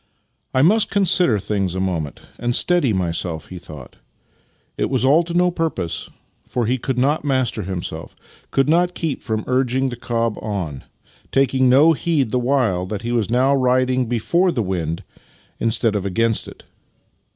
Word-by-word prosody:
" - - -46
I 130 - +4
must 210 +7 +4
consider 180 - +3
things 95 -2 -2
a - - -2
moment 85 -6 -3 0.2
and 120 0 -1
steady 175 -9 +3
myself," 85 -3 -1
he 90 - -8
thought. 75 -7 -12 0.8
Yet - - 0
it - - -4
was 130 -1 +1
all 145 +5 +5
to 170 0 -5
no 180 0 +3
purpose, 160 - -3 0.3
for 120 -2 -2
he 125 +3 0
could 130 +1 -3
not 140 +5 +1
master 130 -5 0
himself 85 -4 -5 0.2
— - - -27
could 135 - +1
not 175 +3 +2
keep 160 -5 -3
from 110 -2 -3
urging 130 +1 +1
the 120 - -5
cob 115 -2 -2
on; 90 -10 -4 0.5
taking 130 -1 +3
no 145 +6 +6
heed 145 -7 0
the 125 - +1
while 120 -8 +1
that 105 +2 -5
he 120 - -3
was 115 -4 0
now 130 +3 +3
riding 130 -1 +2
before 170 - +1
the 120 -8 -1
wind 85 -4 -3 0.6
instead 115 -1 0
of 100 - -1
against 110 +4 0
it. - - -12
120 Hz, 175 wpm, -20 LUFS, 100-135 Hz, 0.8 s, no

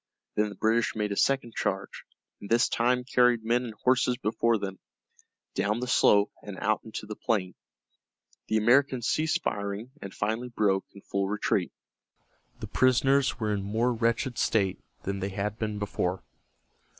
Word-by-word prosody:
Then 105 0 +1
the 100 - -9
British 115 +1 +1
made 105 -1 -1
a - - -1
second 130 0 +1
charge, - - -3 0.3
and 100 - -10
this 115 +1 +4
time 125 +1 +1
carried 125 -2 +3
men 120 +2 +1
and 110 -3 -7
horses 125 -1 +3
before 115 0 +1
them, 95 -2 -5 0.7
down 105 +3 0
the 125 - -2
slope 105 -4 +4
and 100 -2 -8
out 110 +1 0
into 110 -1 -7
the 105 0 -6
plain. 100 -7 -1 0.9
The 110 - +1
Americans 125 +2 +3
ceased 160 +1 +1
firing, 100 +4 -3
and 100 - -7
finally 110 +5 -2
broke 100 -5 +1
in 100 - -12
full 100 0 -2
retreat. 105 +1 0 0.9
The - - -5
prisoners 135 +2 +3
were 105 -2 0
in 100 - -1
more 110 +5 0
wretched 115 +2 0
state 100 -4 +1 0.2
than 100 0 -3
they 95 +1 -2
had 105 +2 -3
been 105 -1 -2
before. 95 -3 -2
110 Hz, 160 wpm, -28 LUFS, 100-125 Hz, 0.9 s, this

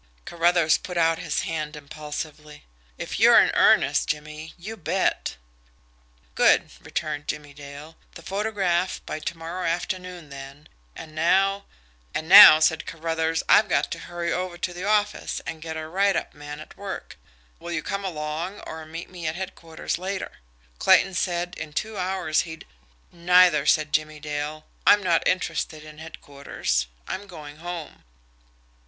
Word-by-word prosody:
Carruthers 170 -1 +3
put 180 -1 -6
out 165 -1 +3
his 150 - -2
hand 155 -2 -4
impulsively. 150 0 -8 0.3
"If - - -5
you're - - +8
in - - +4
earnest, - - +4
Jimmie 155 +1 -5
you 210 +6 -7
bet!" 190 - -1 1.0
"Good!" - - +4
returned 145 - -4
Jimmie 145 -1 -5
Dale. 145 +2 -11 0.2
"The 165 - -11
photograph 195 -3 -1
by 155 - -5
to 165 +2 -5
morrow 170 +3 -5
afternoon 180 -1 -3
then. 140 +2 -11 0.3
And 155 - -10
now 195 +5 +2 0.2
" - - -25
"And 160 - -3
now," 195 -4 +11
said 160 0 +2
Caruthers, 165 0 -1
"I've 215 - +5
got - - +1
to - - -4
hurry 170 0 -3
over 180 -1 -3
to 175 0 -3
the 175 +1 -7
office 210 0 0
and 160 - -6
get 160 0 -5
a 155 0 -5
write 195 +4 +2
up - - -3
man 145 0 -9
at 155 - -12
work. 200 -1 -7 0.4
Will 175 - -7
you 160 -2 -2
come 200 0 -3
along, 165 +2 -4
or 160 0 -8
meet 165 +2 -7
me 175 -3 -6
at 155 - -2
headquarters 170 -3 -5
later? 190 +1 -4 0.5
Clayton 195 - +5
said 175 -1 -1
in 155 -1 -7
two 215 +8 -3
hours 185 -4 0
he'd 160 -1 -9 0.4
" - - -35
"Neither," 175 -3 +4
said 155 -1 +2
Jimmie 155 0 0
Dale. 150 +1 -5 0.2
"I'm 205 -1 +6
not 170 -3 +2
interested 165 -4 -1
in 155 0 -12
headquarters. 140 - -3 0.2
I'm 200 +2 -5
going 150 -5 -10
home." 170 -2 -7
165 Hz, 160 wpm, -25 LUFS, 155-180 Hz, 1.0 s, now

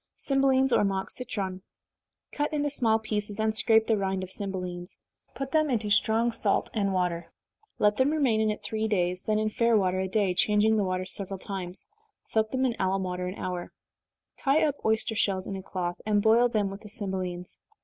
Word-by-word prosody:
321. 270 -1 +3
Cymbelines, - - -6
or - - +2
Mock 195 -1 -1
Citron. 195 -7 -4 0.7
Cut 295 0 -1
into 290 -1 0
small 225 -5 +3
pieces, 210 -1 -3
and 220 0 +1
scrape 220 0 +4
the 225 - +2
rind 190 -1 -1
of 185 - -8
cymbelines 180 -3 -5 0.4
put 270 0 -4
them 310 -1 +2
into 220 -5 0
strong 225 +3 +3
salt 230 - 0
and 200 -3 0
water 180 -2 -1 0.5
let 210 0 +3
them 260 +2 +3
remain 270 -8 +2
in 220 - +2
it 210 - -3
three 220 0 -2
days, 180 -3 0
then 215 -1 +1
in 215 0 0
fair 230 0 +3
water 185 -2 +1
a 190 - -1
day, 195 -1 +1
changing 210 +3 +3
the 210 - +2
water 185 -1 -1
several 195 +1 -3
times 185 -1 -6 0.4
soak 220 -1 0
them 260 +2 0
in 240 -3 0
alum 190 0 +1
water 180 0 -3
an 185 - -5
hour 180 -3 -5 0.6
tie 280 +3 +2
up 290 -2 -1
oyster 220 0 +1
shells 195 -3 0
in 195 - -4
a 190 - -5
cloth, 180 -2 -4
and 205 -1 +1
boil 235 +2 +5
them 210 -4 0
with 195 +1 -8
the 210 - -10
cymbelines. 190 -4 -4
210 Hz, 200 wpm, -28 LUFS, 190-225 Hz, 0.7 s, boil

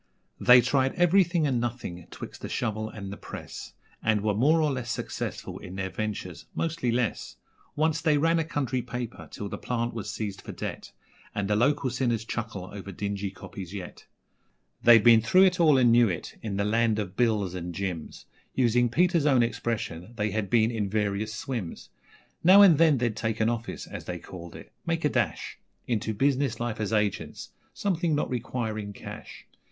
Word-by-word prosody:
They 125 0 +8
tried 130 +2 +1
everything 175 -2 +3
and 130 -5 +1
nothing 110 -8 -5
'twixt - - -9
the - - -5
shovel 110 0 -2
and 100 -3 -7
the - - -8
press, - - -9 0.3
And 110 -2 +2
were 105 0 +1
more 145 +10 +4
or 155 -2 +2
less 130 -3 -4
successful - - -4
in 90 - -9
their 95 -1 -3
ventures 105 -5 -5
mostly 160 -7 -1
less. 120 -2 -1 0.4
Once 160 +1 +1
they 155 -3 +3
ran 165 +3 +3
a - - +2
country 135 -6 -2
paper 120 -1 -6
till 105 - -6
the - - -6
plant 120 -1 -2
was 110 -2 -5
seized 100 -1 -4
for - - -8
debt, - - -6 0.4
And 100 -1 -1
the 105 - +2
local 140 +3 +2
sinners 120 -3 0
chuckle 110 -6 -5
over 100 -1 -7
dingy 100 +1 -3
copies 95 0 -9
yet. 95 -3 -8 0.7
They'd 115 -3 +7
been 115 -2 +7
through 185 - +5
it 185 -1 +3
all 155 -5 +6
and 125 -2 +5
knew 120 -1 +5
it 85 - -5
in 105 -3 -3
the 100 - +1
land 110 0 +2
of 100 -3 -4
Bills 105 -6 +1
and 90 -1 -5
Jims 90 -3 -5 0.3
Using 120 -1 +3
Peter's 170 +3 +3
own 130 -4 +5
expression, 115 -5 -3
they 105 -1 -1
had 105 -1 -2
been 115 -1 +3
in 105 -4 -2
'various 105 0 -1
swims'. 110 -5 -5 0.5
Now 190 +4 +9
and 170 -7 +7
then 160 -4 +5
they'd 120 -3 0
take 110 0 -2
an 110 +1 +3
office, 115 -1 -4
as - - -8
they 90 - -4
called 85 -1 -10
it, - - -12
make 165 -1 -1
a - - +4
dash 120 -6 -2 0.3
Into 110 -2 -1
business 135 -1 +1
life 120 -2 -3
as 110 -1 -2
'agents' 105 -3 -1 0.2
something 175 -5 0
not 145 - -1
requiring 110 -4 -3
cash. - - -10
115 Hz, 185 wpm, -27 LUFS, 105-135 Hz, 0.7 s, Now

